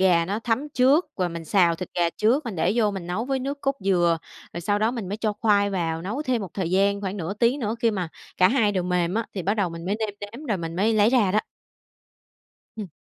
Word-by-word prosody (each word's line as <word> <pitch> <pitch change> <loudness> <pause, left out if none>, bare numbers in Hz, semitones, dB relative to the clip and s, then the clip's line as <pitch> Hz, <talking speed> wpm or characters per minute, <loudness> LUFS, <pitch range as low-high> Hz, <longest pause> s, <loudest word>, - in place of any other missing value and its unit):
gà 175 -3 +4
nó 200 +4 -2
thấm 235 +6 -1
trước, 275 +7 +4
và 180 -2 0
mình 165 -1 -7
xào 170 -1 +3
thịt 185 +1 -6
gà 170 -1 +2
trước, 250 +7 +2
mình 225 -6 -5
để 170 +4 +2
vô 215 -3 +3
mình 190 -4 -6
nấu 195 +7 -2
với 270 0 -1
nước 280 +2 -4
cốt 275 0 0
dừa. 175 -3 +3 0.3
Rồi 170 - -5
sau 205 +4 0
đó 220 +2 +2
mình 230 -7 -5
mới 205 - -3
cho 215 -1 -1
khoai 205 -2 +3
vào, 165 -3 -2
nấu 215 - -3
thêm 255 -4 0
một 190 - -8
thời 180 -4 -2
gian 200 +2 +2
khoảng 195 0 -3
nửa 185 +1 -4
tiếng 240 +6 +2
nữa 220 0 -1
khi 230 - +3
mà 185 -6 -3 0.3
cả 185 - +5
hai 225 -5 +2
đều 185 -2 0
mềm 180 0 0
á, 225 +1 -1
thì 185 - -3
bắt 200 +4 +1
đầu 200 -5 0
mình 165 0 -8
mới 200 +3 -1
nêm 220 -1 -1
nếm, 230 +9 -8
rồi 210 - 0
mình 165 0 -5
mới 220 +4 +2
lấy 215 +2 +4
ra 215 -8 +3
đó. 215 - +3 1.4
Ừm. 215 -3 -5
200 Hz, 265 wpm, -24 LUFS, 180-225 Hz, 1.4 s, cả